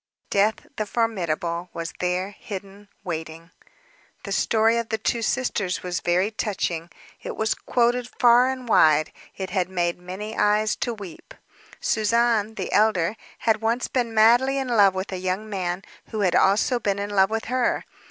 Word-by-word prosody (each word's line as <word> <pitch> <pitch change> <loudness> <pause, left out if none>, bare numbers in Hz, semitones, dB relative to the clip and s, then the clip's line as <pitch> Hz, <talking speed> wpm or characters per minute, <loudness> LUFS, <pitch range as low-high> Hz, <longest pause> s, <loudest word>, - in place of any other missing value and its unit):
Death, 205 +2 +2
the 215 - -2
formidable, 175 -6 -1
was 165 -1 -5
there, 180 +2 -1
hidden, 200 0 -9
waiting. 165 -1 -6 0.7
The - - -6
story 225 +1 +2
of 235 -1 -2
the 220 - 0
two 230 +2 -1
sisters 215 -6 -1
was 180 0 -2
very 180 +4 +1
touching. 175 -6 -2 0.3
It - - -6
was 220 0 +1
quoted 245 0 0
far 245 +1 +6
and 260 -2 -5
wide; 155 -7 +4 0.3
it 190 -1 -5
had 185 -2 0
made 175 -2 -1
many 190 +5 -7
eyes 210 +1 +2
to 240 - -2
weep. 195 -6 -11 0.4
Suzanne, 225 0 +1
the - - -4
elder, 205 -3 +2 0.3
had 220 -1 +2
once 230 +2 0
been 245 -3 -1
madly 240 +5 +4
in 265 -2 -2
love 200 -5 +5
with 190 +1 -4
a 185 - -3
young 185 +3 -2
man, 185 -2 -3 0.3
who 215 -2 -3
had 185 -3 +2
also 215 +6 +3
been 200 -3 -1
in 200 +1 -4
love 195 -1 +4
with 225 0 -2
her. 250 +1 0
205 Hz, 165 wpm, -24 LUFS, 185-225 Hz, 0.7 s, far